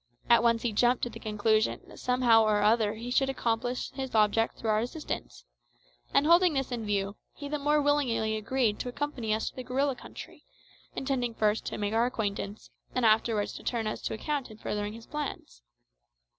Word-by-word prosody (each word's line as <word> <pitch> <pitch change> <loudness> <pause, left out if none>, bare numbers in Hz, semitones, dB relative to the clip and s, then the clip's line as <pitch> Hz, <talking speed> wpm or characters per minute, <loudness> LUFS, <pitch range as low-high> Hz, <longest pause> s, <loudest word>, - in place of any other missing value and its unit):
At 235 - +7
once 230 -1 +2
he 235 -3 0
jumped 245 +3 +3
to 240 - -1
the - - -9
conclusion 215 +1 +1
that - - -14
somehow 245 -3 +4
or 210 -1 +2
other 215 0 +3
he 235 +3 -6
should 270 +1 +2
accomplish 245 -1 -1
his 265 -3 -5
object 215 +1 +3
through 220 - -1
our 215 - +3
assistance; 140 - -5 0.7
and 280 - +3
holding 340 0 +5
this 270 -1 -1
in 230 -3 -3
view, 200 0 -1 0.2
he 285 - -7
the 300 +1 -2
more 295 +1 +2
willingly 265 -7 +1
agreed 220 0 0
to 250 - -3
accompany 250 -4 -3
us 220 +1 0
to - - -33
the 255 - -6
gorilla 265 +2 0
country, - - -11 0.5
intending 250 -4 -1
first 215 0 +1
to - - -4
make 205 0 -2
our 230 +2 +3
acquaintance, 205 -3 -4 0.2
and 255 -2 +2
afterwards 220 -1 +2
to - - -9
turn 230 -2 -1
us 215 - -3
to - - -3
account 285 +3 -3
in 215 - -12
furthering 210 -1 -3
his 225 0 -11
plans. 280 - -6
230 Hz, 195 wpm, -29 LUFS, 215-260 Hz, 0.7 s, At